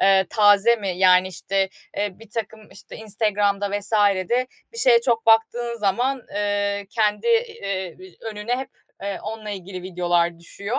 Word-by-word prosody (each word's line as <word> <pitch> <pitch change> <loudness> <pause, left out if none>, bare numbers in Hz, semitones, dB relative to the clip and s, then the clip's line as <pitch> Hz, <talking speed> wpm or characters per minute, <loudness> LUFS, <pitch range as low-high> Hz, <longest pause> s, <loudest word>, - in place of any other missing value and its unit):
eee, 190 -1 +4
taze 210 +2 +5
mi? 200 -3 -5
Yani 185 0 +5
işte, 190 +2 -1 0.3
eee, 205 -2 -2
birtakım, 220 -1 -7
işte, - - -12
Instagram'da 205 -2 0
vs.de 205 +3 +1 0.3
bir 460 - -8
şeye 240 - +5
çok 235 -2 0
baktığın 235 +1 +3
zaman, 245 +6 0
eee, 205 0 -1
kendi, 210 - 0
eee, 450 - -1 0.3
önüne 225 +2 -3
hep 265 - -6 0.5
onunla 220 -1 -6
ilgili 185 -2 -7
videolar 175 -2 0
düşüyor. 200 +6 -5
205 Hz, 135 wpm, -23 LUFS, 195-225 Hz, 0.5 s, taze